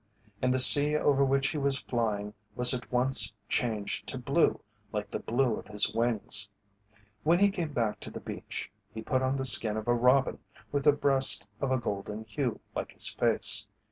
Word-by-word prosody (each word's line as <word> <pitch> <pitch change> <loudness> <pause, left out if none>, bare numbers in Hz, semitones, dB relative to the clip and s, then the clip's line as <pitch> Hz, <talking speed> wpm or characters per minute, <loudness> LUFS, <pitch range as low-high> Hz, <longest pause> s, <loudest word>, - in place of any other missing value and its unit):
And 125 - 0
the 130 - 0
sea 145 +3 +8
over 140 -2 +1
which 135 0 0
he 155 - -5
was 140 -1 0
flying 105 -4 -4 0.2
was 125 0 +9
at 125 -1 -7
once 125 0 +1 0.2
changed 110 -4 -3
to - - -4
blue - - -1 0.3
like - - -6
the - - -5
blue 120 -1 -2
of - - -12
his 105 0 0
wings. 110 -2 0 0.7
When 165 +3 +1
he 200 +2 +2
came 170 -5 -5
back 110 -6 -3
to - - -10
the - - -10
beach, - - -8 0.2
he 110 - -8
put 130 +3 -2
on 130 +1 -2
the 135 -1 -4
skin 110 -3 +1
of 110 - -7
a 120 - +2
robin 125 +3 +1 0.3
with 140 -1 -3
the 150 - +6
breast 135 -6 +3
of 135 - -3
a 130 - +1
golden 105 -1 -6
hue 115 +3 -5
like - - -6
his - - +2
face. - - +2
125 Hz, 195 wpm, -27 LUFS, 110-135 Hz, 0.7 s, was